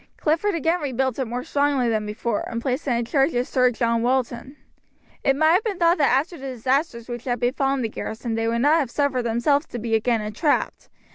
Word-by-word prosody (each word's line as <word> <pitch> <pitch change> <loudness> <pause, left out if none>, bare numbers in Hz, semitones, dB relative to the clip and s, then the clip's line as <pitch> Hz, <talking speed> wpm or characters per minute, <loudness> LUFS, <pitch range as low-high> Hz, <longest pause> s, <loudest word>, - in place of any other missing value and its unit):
Clifford 330 +6 +1
again 330 +2 0
rebuilt 265 -2 -1
it 265 - 0
more 245 +2 -4
strongly 285 -3 +1
than 215 -2 -1
before, 210 +1 -2
and 230 - -3
placed 260 +4 -2
it 245 -3 +2
in 235 - -1
charge 270 +4 +1
of 245 +1 0
Sir 255 -1 +3
John 230 -1 0
Walton. 255 +2 -1 0.7
It 270 - +3
might 315 +3 +4
have 370 +5 +3
been 415 -5 -2
thought 340 0 +3
that 285 - +3
after 320 +4 -3
the 270 - -6
disasters 255 0 -1
which 240 -1 -6
had 245 -2 -1
befallen 270 +1 0
the - - 0
garrison 220 +1 -5
they 225 0 -1
would 235 +1 0
not 300 +4 +4
have 275 -6 -1
suffered 275 -1 0
themselves 240 +6 +1
to - - -6
be 225 0 -3
again 225 +1 +2
entrapped. 215 +9 -1
255 Hz, 220 wpm, -23 LUFS, 235-290 Hz, 0.7 s, might